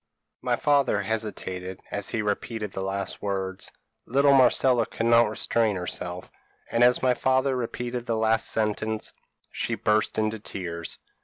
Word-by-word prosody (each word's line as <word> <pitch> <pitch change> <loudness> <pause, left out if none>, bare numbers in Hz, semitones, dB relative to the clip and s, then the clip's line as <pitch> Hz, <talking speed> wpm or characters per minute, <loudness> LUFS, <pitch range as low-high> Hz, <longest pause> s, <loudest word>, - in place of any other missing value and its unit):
p> - - -11
"My - - +3
father 145 -2 +2
hesitated, 95 -4 -4
as 100 -1 -1
he 110 -2 -1
repeated 105 0 -2
the 95 - -5
last 100 +1 -3
words; 95 -2 -3 0.4
little 140 +3 +4
Marcella 125 -2 +4
could 115 - -3
not 115 -1 +5
restrain 110 0 +1
herself, 90 0 -5 0.4
and 115 +1 +3
as 125 +1 +4
my 130 -1 +4
father 130 +1 +1
repeated 120 0 -4
the 115 -1 0
last 110 0 +2
sentence, 110 0 -1 0.4
she - - -2
burst 105 0 +1
into 110 0 0
tears. 85 -5 -5
110 Hz, 150 wpm, -26 LUFS, 100-120 Hz, 0.4 s, not